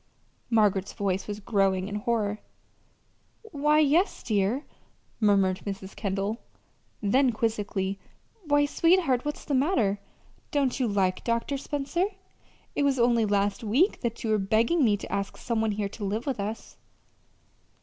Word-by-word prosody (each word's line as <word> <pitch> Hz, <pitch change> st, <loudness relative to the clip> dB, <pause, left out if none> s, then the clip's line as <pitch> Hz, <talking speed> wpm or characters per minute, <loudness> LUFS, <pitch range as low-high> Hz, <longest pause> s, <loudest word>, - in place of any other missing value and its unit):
Margaret's 205 Hz, -4 st, +2 dB
voice 195 Hz, -1 st, -2 dB
was 205 Hz, 0 st, -4 dB
growing 195 Hz, -3 st, +1 dB
in 205 Hz, -, -6 dB
horror. 210 Hz, -1 st, -1 dB, 1.0 s
"Why, 300 Hz, -7 st, +1 dB
yes, 310 Hz, +6 st, +3 dB
dear," 215 Hz, +6 st, 0 dB, 0.5 s
murmured 195 Hz, -4 st, +3 dB
Mrs. 195 Hz, -1 st, -6 dB
Kendall; 200 Hz, +2 st, -2 dB, 0.6 s
then, 255 Hz, +6 st, +3 dB
quizzically: 205 Hz, -3 st, -2 dB, 0.5 s
"Why, 290 Hz, 0 st, +4 dB
sweetheart, 330 Hz, -5 st, +2 dB
what's 295 Hz, 0 st, -4 dB
the 290 Hz, -, -2 dB
matter? 255 Hz, -, +2 dB, 0.5 s
Don't 280 Hz, -4 st, 0 dB
you 255 Hz, -, +2 dB
like 190 Hz, -3 st, 0 dB
Dr. 235 Hz, +4 st, -1 dB
Spencer? 290 Hz, +5 st, -1 dB, 0.7 s
It -, -, -1 dB
was 280 Hz, -2 st, +2 dB
only 235 Hz, -2 st, +3 dB
last 200 Hz, +1 st, 0 dB
week 265 Hz, -, +2 dB
that 235 Hz, -2 st, -3 dB
you 225 Hz, -, 0 dB
were 215 Hz, -, +3 dB
begging 225 Hz, -, +2 dB
me 210 Hz, -4 st, +3 dB
to -, -, -9 dB
ask 200 Hz, 0 st, -3 dB
some 230 Hz, -2 st, -1 dB
one 220 Hz, -1 st, +1 dB
here 200 Hz, -1 st, -2 dB
to 210 Hz, -, -8 dB
live 210 Hz, +4 st, -2 dB
with 270 Hz, -6 st, -2 dB
us." 210 Hz, +3 st, -5 dB
220 Hz, 145 wpm, -27 LUFS, 200-275 Hz, 1.0 s, Why